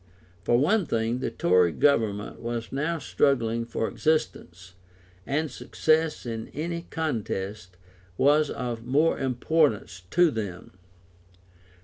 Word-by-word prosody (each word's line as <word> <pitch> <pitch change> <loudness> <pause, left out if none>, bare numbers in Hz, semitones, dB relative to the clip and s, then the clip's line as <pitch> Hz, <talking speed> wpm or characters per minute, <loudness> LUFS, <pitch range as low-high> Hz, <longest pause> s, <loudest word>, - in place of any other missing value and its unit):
For 120 - +3
one 180 - +2
thing, 115 +1 0
the - - -2
Tory 90 -1 +3
Government 110 - +1
was 120 -1 -4
now 150 +5 -1
struggling 115 -6 +1
for 115 -1 -2
existence, 95 - -2 0.5
and 155 +1 -1
success 155 +5 0
in 115 -1 -4
any 170 +3 -4
contest 105 - -4 0.4
was 145 +2 +4
of 120 -2 -4
more 145 +7 +2
importance 130 - 0
to 175 -2 +4
them. 100 -6 -5
125 Hz, 110 wpm, -26 LUFS, 110-155 Hz, 0.5 s, was